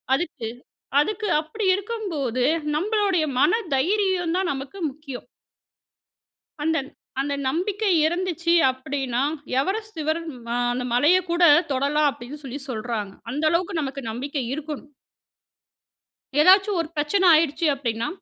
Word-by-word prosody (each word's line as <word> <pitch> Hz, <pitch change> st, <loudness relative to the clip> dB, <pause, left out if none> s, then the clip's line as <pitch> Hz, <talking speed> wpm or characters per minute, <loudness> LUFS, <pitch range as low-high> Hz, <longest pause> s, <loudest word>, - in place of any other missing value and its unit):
அதுக்கு, 270 Hz, -8 st, -4 dB, 0.5 s
அதுக்கு 425 Hz, +5 st, -2 dB
அப்பிடி 390 Hz, +6 st, -3 dB
இருக்கும்போது, 365 Hz, -, -2 dB, 0.3 s
நம்மளுடைய 395 Hz, -2 st, +1 dB
மன 305 Hz, -, +4 dB, 0.2 s
தைரியந்தான் 370 Hz, +2 st, +1 dB
நமக்கு 270 Hz, +7 st, -7 dB
முக்கியம். 275 Hz, -3 st, -9 dB, 1.3 s
அந்தந் 300 Hz, -3 st, 0 dB, 0.3 s
அந்த 285 Hz, +1 st, -1 dB
நம்பிக்கை 395 Hz, +8 st, 0 dB, 0.2 s
இருந்துச்சு. 340 Hz, -1 st, 0 dB, 0.2 s
அப்பிடின்னா 260 Hz, -1 st, -2 dB, 0.4 s
எவரெஸ்ட் 430 Hz, +6 st, -2 dB
சிகரம் 315 Hz, +2 st, -2 dB, 0.2 s
அ -, -, 0 dB, 0.2 s
அந்த 250 Hz, +1 st, -2 dB
மலையக் 340 Hz, +9 st, +4 dB
கூட 345 Hz, +1 st, +2 dB, 0.3 s
தொடலாம் 285 Hz, +3 st, +2 dB
அப்பிடின்னு 275 Hz, +3 st, -9 dB
சொல்லி 270 Hz, +2 st, -6 dB
சொல்றாங்க. 215 Hz, -4 st, -3 dB, 0.2 s
அந்த 295 Hz, +4 st, -3 dB
அளவுக்கு 345 Hz, +2 st, 0 dB
நமக்கு 275 Hz, 0 st, -4 dB
நம்பிக்கை 270 Hz, +4 st, -3 dB
இருக்கணும். 295 Hz, 0 st, -6 dB, 1.5 s
ஏதாச்சும் 385 Hz, +3 st, +5 dB
ஒரு 330 Hz, -, -5 dB
பிரச்சனை 300 Hz, +7 st, +1 dB
ஆயிடுச்சு. 320 Hz, +1 st, +1 dB
அப்பிடின்னா, 235 Hz, -4 st, -2 dB
310 Hz, 110 wpm, -24 LUFS, 270-370 Hz, 1.5 s, ஏதாச்சும்